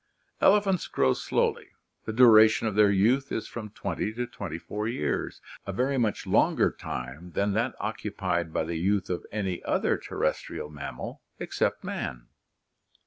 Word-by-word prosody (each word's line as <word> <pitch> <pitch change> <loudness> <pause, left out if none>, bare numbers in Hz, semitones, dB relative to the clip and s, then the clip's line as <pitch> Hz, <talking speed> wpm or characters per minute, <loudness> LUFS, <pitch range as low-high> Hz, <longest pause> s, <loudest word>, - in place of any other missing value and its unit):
Elephants 195 -3 +4
grow 65 -1 +2
slowly; - - 0 0.4
the - - -2
duration 110 -2 +7
of 110 - -1
their 105 0 +5
youth 115 +8 +2
is 110 - -2
from 110 -3 -7
twenty 105 0 -3
to 120 +2 -3
twenty 85 -9 -6
four 105 +5 -4
years, 115 - -2 0.3
a - - -1
very 130 +8 0
much 110 -3 0
longer - - +3
time 70 +8 -7
than 100 0 +1
that 115 +5 0
occupied 85 -1 -2
by - - 0
the 80 +1 -3
youth 95 +2 0
of 90 - -2
any 95 -4 -3
other - - +1
terrestrial 75 - -3
mammal 70 -2 -7 0.2
except - - -1
man. - - -4
105 Hz, 150 wpm, -27 LUFS, 85-115 Hz, 0.4 s, duration